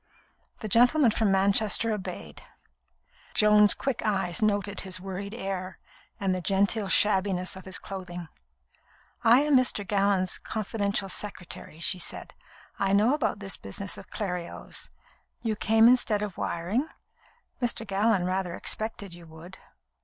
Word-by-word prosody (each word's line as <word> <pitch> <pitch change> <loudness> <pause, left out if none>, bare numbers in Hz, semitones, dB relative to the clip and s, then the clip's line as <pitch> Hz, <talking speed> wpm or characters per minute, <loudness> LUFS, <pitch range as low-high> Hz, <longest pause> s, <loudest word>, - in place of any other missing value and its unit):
The 215 - -4
gentleman 245 +4 +4
from 215 -2 +1
Manchester 200 +3 +2
obeyed. 205 -3 -7 0.9
Joan's 210 -1 +7
quick 270 -4 -2
eyes 195 -5 0
noted 205 -1 0
his 185 -1 -1
worried 195 +3 -6
air 190 -4 -5 0.4
and 195 -2 0
the 185 - -2
genteel 200 +3 +1
shabbiness 190 -3 +2
of 190 - -11
his 190 -1 -2
clothing. 180 -3 -7 1.0
"I 240 +3 +6
am 295 -1 +3
Mr. 245 -6 +2
Gallon's 195 -2 +1
confidential 205 -2 -2
secretary," 185 -5 -4
she 175 +2 0
said. - - -4 0.5
"I 195 0 +1
know 215 +6 +4
about 300 -7 0
this 195 -1 -3
business 185 - -5
of - - -10
Clerios. 180 -5 -5 0.5
You 220 -2 -1
came 225 +2 +4
instead 235 -4 +3
of 205 -4 -5
wiring? 195 - -2 0.7
Mr. 235 -2 -1
Gallon 200 -1 +1
rather 185 -1 -2
expected 210 -4 -4
you 170 -1 -12
would." 160 +4 -12
200 Hz, 135 wpm, -27 LUFS, 185-220 Hz, 1.0 s, Joan's